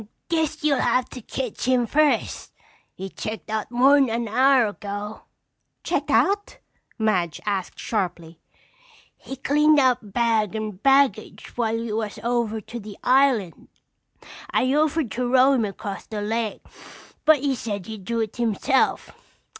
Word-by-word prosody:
"Guess 315 -2 -1
you'll 285 -3 +2
have 255 0 +1
to 250 - -9
ketch 250 0 -5
him 250 -1 +2
first. 300 +5 0 0.4
He 190 - -6
checked 215 +3 -7
out 220 -1 -2
mor'n 265 +2 +4
an 230 +1 -2
hour 255 +3 +4
ago." 205 0 -6 0.6
"Checked - - -2
out?" 405 +1 +1 0.4
Madge 185 -8 0
asked 195 -3 -3
sharply. 175 -6 -3 0.8
"He 270 - -9
cleaned 300 +3 +3
out 250 -6 +1
bag 225 -3 +1
and 215 -3 -5
baggage 270 -6 +1
while 225 -2 0
you 225 -2 -3
was 215 -2 -4
over 235 -2 0
to 235 +4 -8
the 210 -2 -10
island. 255 -8 +2 0.8
I 255 +1 +1
offered 305 -3 +1
to 245 0 -2
row 260 +1 +5
him 240 -5 +1
across 200 0 -6
the 210 -2 -4
lake 225 0 -3 0.6
but 305 -3 +5
he 280 -1 +1
said 205 -6 -4
he'd 215 -3 -8
do 230 +2 -1
it 220 -1 -4
himself. 240 +3 +1
235 Hz, 145 wpm, -23 LUFS, 210-270 Hz, 0.8 s, row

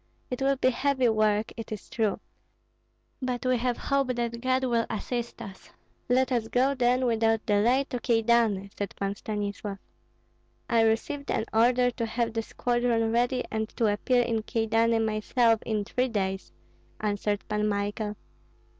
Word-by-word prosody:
It 250 - -3
will 275 +1 +3
be 255 -1 +2
heavy 260 -1 +1
work, 215 -1 +1
it 225 -2 -8
is 215 - -6
true. 220 -3 -1 1.0
But 255 -1 -2
we 255 -1 +3
have 245 0 -1
hope 275 -1 0
that 235 -1 -3
God 260 +1 +1
will 235 -3 +1
assist 235 +2 -4
us." 195 -1 -11 0.4
"Let 260 +2 +3
us 235 -3 0
go, 260 +4 +2
then, 250 0 +2
without 225 -2 +1
delay 230 +6 +3
to 250 - -2
Kyedani," 225 -4 +2
said 200 -2 -4
Pan 195 0 -2
Stanislav. 205 -1 -4 0.9
"I 230 -1 +3
received 225 +6 0
an 220 - 0
order 245 +2 +4
to 235 -1 -3
have 230 0 -1
the 225 - 0
squadron 240 -1 0
ready 245 +2 +1
and 220 0 -2
to 220 -3 +3
appear 245 +4 +2
in 225 -2 -1
Kyedani 225 +1 +1
myself 225 +1 +2
in 215 -2 -1
three 255 +5 0
days," 195 -4 -2 0.5
answered 205 -1 -1
Pan 210 0 0
Michael. 205 +1 -2
230 Hz, 155 wpm, -27 LUFS, 215-245 Hz, 1.0 s, order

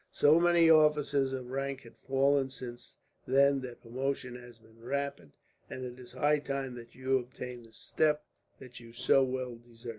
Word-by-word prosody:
So 150 +3 +5
many 170 -1 +5
officers 150 -3 +4
of 130 -2 -5
rank 135 0 -3
have 115 - -15
fallen 135 0 +1
since 125 -2 -9 0.3
then 140 +1 +4
that 125 -2 -9
promotion 130 +1 -3
has 120 -1 -12
been 110 0 -22
rapid, 140 - -3 0.4
and 130 - -6
it 125 0 -8
is 125 - -13
high 150 +1 +2
time 135 -2 -4
that 120 -1 -11
you 130 0 +1
obtained 125 -1 -8
the 110 - -22
step 150 -1 0 0.3
that 125 -2 -12
you 115 -1 -14
so 135 +3 +3
well 130 -2 -3
deserve. 120 0 -12
130 Hz, 175 wpm, -31 LUFS, 120-140 Hz, 0.4 s, So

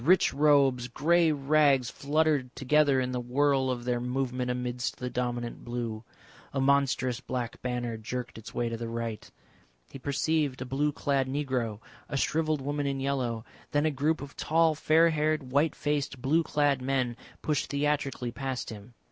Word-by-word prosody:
Rich 180 +6 +4
robes, 140 -4 +4
grey 165 +6 +3
rags 140 -3 +3
fluttered 145 -3 0
together 140 0 +3
in 125 0 -1
the 125 - -2
whirl 135 +2 +2
of 120 -1 -3
their 125 -1 0
movement 125 0 -2
amidst 125 0 -2
the 125 0 -4
dominant 120 -1 -3
blue. 120 -2 -4 0.5
A 135 - -1
monstrous 135 -2 +2
black 125 -3 -4
banner 120 -2 -2
jerked 115 +1 -5
its 110 - -10
way 120 - -1
to 115 0 -3
the 115 0 -4
right. 115 -1 -4 0.6
He 135 - -8
perceived 145 0 0
a 130 - -4
blue 140 +3 0
clad 140 -2 0
negro, 130 -6 -2 0.3
a 140 - -2
shrivelled 155 +1 +1
woman 145 +1 -2
in 135 -1 -1
yellow, 125 -4 -1 0.3
then 145 +1 +3
a 155 - +2
group 150 +3 0
of 140 - -10
tall 165 0 +3
fair 160 +2 +4
haired, 155 -3 0
white 145 +4 +2
faced, 145 -2 -1
blue 150 +7 +2
clad 145 -4 +1
men 130 -2 0 0.3
pushed 150 -2 0
theatrically 140 -4 -1
past 130 -1 -4
him. 110 +3 -11
135 Hz, 165 wpm, -29 LUFS, 125-145 Hz, 0.6 s, Rich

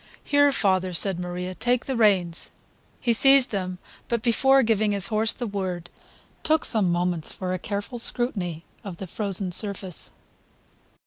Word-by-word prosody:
"Here, 285 0 +3
father," 185 -6 +1
said 180 +1 0
Maria, 180 +1 -5
"take 245 +7 0
the 265 - -3
reins!" 190 -7 +1 0.5
He 235 - +1
seized 270 +2 +5
them, 185 -3 -3 0.3
but 235 -2 -2
before 265 +3 +3
giving 215 -2 +1
his 200 -1 +4
horse 220 +1 +2
the 245 - -2
word, 185 -5 -5 0.5
took 315 0 +1
some 205 -6 +2
moments 175 -2 -1
for 185 -1 -4
a 185 - -3
careful 205 +6 -5
scrutiny 190 -10 +1 0.2
of 190 -4 -8
the 190 - -7
frozen 195 0 -1
surface. 190 -2 -2
200 Hz, 150 wpm, -24 LUFS, 180-235 Hz, 0.5 s, seized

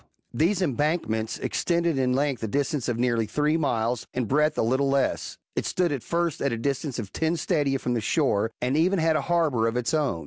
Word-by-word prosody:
These 185 +5 +2
embankments 135 -7 -1
extended 170 -4 0
in 125 -1 +2
length 135 -3 0
a 110 - -2
distance 140 +2 -1
of 120 - -1
nearly 120 -2 +1
three 150 +7 +1
miles, 120 -6 0
in 125 -1 0
breadth 150 +5 +2
a - - +2
little 130 +4 +1
less. 135 -1 0 0.2
It - - -1
stood 180 -3 +1
at 140 -4 -2
first 170 +5 -1
at 140 - +1
a 115 - -2
distance 135 +2 -2
of 105 -5 -6
ten 160 +1 0
stadia 145 -5 +1
from 125 -2 -2
the 120 - 0
shore, 115 -4 +1
and 125 +3 0
even 180 +5 +3
had 160 -1 +2
a 155 - +1
harbour^ 150 -9 +1
of 115 - -3
its 125 +6 -1
own. 145 - +1
140 Hz, 215 wpm, -26 LUFS, 120-160 Hz, 0.2 s, even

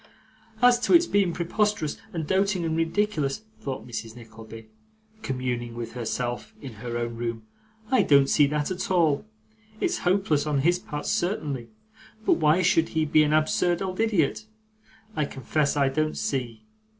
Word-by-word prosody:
'As 245 -1 +6
to 245 - +4
its 340 0 +6
being 200 - +2
preposterous, 180 -1 -1
and 165 -3 -3
doting, 190 +1 +1
and 160 -1 -1
ridiculous,' 165 -1 0 0.2
thought 135 -2 -5
Mrs 115 -1 -6
Nickleby, 115 -1 -12 0.5
communing 125 - -3
with 115 -1 -5
herself 120 0 -4
in 135 -4 -8
her 120 -1 -3
own 120 -1 -3
room, 115 -1 -4 0.5
'I 260 - +5
don't 140 -2 +5
see 145 0 +4
that, 150 +3 -1
at 185 - -3
all. 170 -1 +2 0.5
It's 365 0 0
hopeless 175 -6 +1
on 145 -2 +1
his 175 +4 +2
part, 150 -4 -6
certainly; 145 - -2 0.6
but - - +4
why 155 0 +4
he 185 - +1
should 160 -3 +1
be 155 - +6
an 150 0 +2
absurd 165 +3 +2
old 185 0 -4
idiot, 215 -2 +1 0.7
I 150 - +1
confess 140 +3 -1
I 140 -1 +3
don't 155 +3 -1
see. 120 -5 -3
150 Hz, 160 wpm, -26 LUFS, 125-180 Hz, 0.7 s, As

